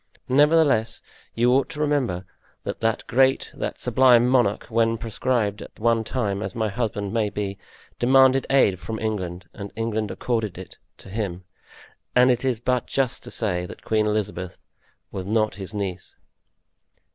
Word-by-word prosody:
Nevertheless, 145 -5 +3 0.3
you 120 +2 +3
ought 135 +1 +2
to 150 - -7
remember 135 -12 0 0.4
that - - -4
that 115 0 0
great, 135 +2 +2
that - - -4
sublime 125 -2 +5
monarch, 120 -5 +2
when 115 0 +2
proscribed 115 -2 -1
at - - -12
one 115 0 +2
time, 105 -5 -2
as - - -5
my 110 -2 0
husband 105 -2 -3
may 110 -3 +1
be, 100 -1 -4 0.4
demanded 130 +1 +5
aid 105 -9 +3
from 110 +3 -5
England 95 -5 -4
and 100 0 -8
England 110 -1 -2
accorded 110 -7 -2
it 95 - -10 0.2
to - - -14
him; 95 -3 -4 0.7
and 125 +1 +6
it 120 0 0
is 130 -4 0
but 125 +1 0
just 135 -3 -1
to - - -8
say 90 -5 -1
that - - -11
Queen 110 -1 +1
Elizabeth 105 -4 -3 0.5
was 95 - -4
not 110 0 +1
his 95 - -5
niece." 95 -4 -5
110 Hz, 155 wpm, -24 LUFS, 100-125 Hz, 0.7 s, and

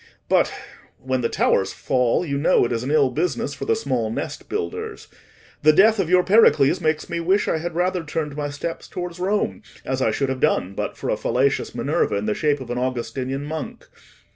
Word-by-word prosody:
But—when 130 0 -2
the 115 - 0
towers 95 0 +1
fall, 125 +5 +1
you 140 -3 -2
know 150 -3 +4
it 120 - -3
is 115 -1 -1
an 130 - -4
ill 145 -3 +3
business 145 -2 -1
for 140 - -6
the - - +2
small 130 - -1
nest - - -5
builders—the 145 - -3
death 215 +5 +5
of 180 -4 0
your 180 0 +5
Pericles 180 -5 +4
makes 155 -1 0
me 170 -1 -3
wish 190 +5 +1
I 160 - +1
had 170 +1 -5
rather 180 0 0
turned 150 -2 -3
my 145 -1 -3
steps 145 +4 -5
towards 180 -1 -6
Rome, 200 +3 -1 0.2
as 130 0 -2
I 115 - +3
should 135 +4 -1
have 130 -1 -2
done 95 -5 +1
but - - -4
for - - -2
a - - 0
fallacious - - 0
Minerva - - 0
in 100 +1 -2
the 105 - +1
shape 145 +2 0
of 125 -2 -7
an 125 - -2
Augustinian 130 +2 -3
monk. 155 0 -6
145 Hz, 200 wpm, -22 LUFS, 130-175 Hz, 0.2 s, death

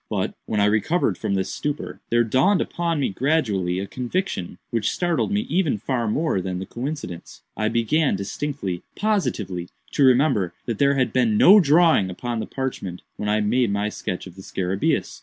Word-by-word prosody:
But, - - -1
when 105 - 0
I 100 - +4
recovered 110 - +1
from 100 - -2
this 95 -1 -2
stupor, 145 0 -4
there 120 0 +3
dawned 135 - +3
upon 170 -2 -1
me 140 - +1
gradually 105 - 0
a 95 - -2
conviction 120 - -3
which 115 -3 0
startled 175 +2 0
me 205 +1 +1
even 185 - 0
far 120 +2 -2
more 125 - 0
than 90 0 -3
the 95 - -5
coincidence. 125 - -6
I 110 - 0
began 120 +5 +2
distinctly, 100 -1 -4
positively, 105 - -1 0.2
to 145 - +2
remember 130 - +3
that 115 -4 -3
there 140 0 +4
had 130 -4 +1
been 120 -4 +2
no 200 - +8
drawing 160 - +4
upon 115 +6 -4
the - - -4
parchment 110 -9 -4
when 105 - -2
I 105 +1 +2
made 115 +3 +2
my 100 +1 0
sketch 90 -3 -5
of 95 - -10
the 95 - -10
scarabæus. 95 0 -1
120 Hz, 180 wpm, -23 LUFS, 100-150 Hz, 0.2 s, no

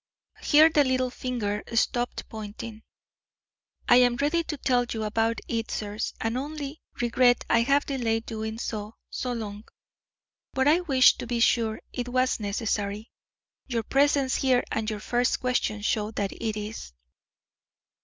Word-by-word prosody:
Here 310 +2 +6
the 295 -2 +4
little 255 -1 0
finger 220 -6 -3
stopped 240 +2 0
pointing. 220 0 -8 1.1
"I 245 - +7
am 245 -1 +5
ready 295 +6 +1
to 300 - -4
tell 250 -2 +2
you 220 -1 -2
about 225 +2 0
it, 225 -1 -2
sirs, 210 0 -3
and 225 +3 -1
only 290 +1 -6 0.2
regret 245 +1 +3
I 230 - +5
have 275 +4 +2
delayed 230 -5 -1
doing 220 -1 -4
so 215 -1 -5 0.2
so 250 - -3
long, 210 -3 -5 0.9
but 265 +1 +2
I 315 +4 +5
wished 270 -8 +4
to - - -5
be 240 0 -1
sure 225 -2 +2
it 245 -1 -3
was 255 0 +1
necessary. 205 0 -2 0.6
Your 235 -4 -1
presence 275 +2 +2
here 255 -2 +2
and 220 -1 -1
your 215 -1 -4
first 245 +3 +1
question 245 -4 -1
show 210 0 0
that 205 -3 -2
it 220 -2 -3
is." 210 - -6
240 Hz, 150 wpm, -26 LUFS, 220-260 Hz, 1.1 s, I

